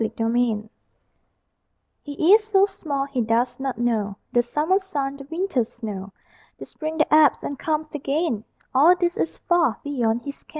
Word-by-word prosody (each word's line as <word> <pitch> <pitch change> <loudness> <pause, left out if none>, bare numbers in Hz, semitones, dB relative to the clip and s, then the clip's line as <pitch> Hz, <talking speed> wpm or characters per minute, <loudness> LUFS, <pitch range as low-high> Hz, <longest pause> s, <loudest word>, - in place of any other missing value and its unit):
SIX 225 0 -2
WEEKS 230 -1 +1
OLD 215 - -21 1.3
He 310 +5 +2
is 435 0 +6
so 400 -2 +4
small, 295 -8 -3
he 275 -3 -2
does 235 +3 0
not 265 -1 -3
know 220 -4 -1
The 240 - +4
summer 300 +10 +1
sun, 280 -8 -4
the 275 - -10
winter 330 -6 0
snow; 210 -4 -7 0.5
The - - -8
spring 315 0 -6
that 305 -1 +1
ebbs 305 -3 +5
and 280 -1 -5
comes 310 -1 -2
again, 285 -5 -1 0.3
All 305 +7 +6
this 350 -1 0
is - - -2
far 335 -11 +1
beyond 240 -5 -1
his 280 +2 -8
ken. - - -31
280 Hz, 175 wpm, -23 LUFS, 235-320 Hz, 1.3 s, is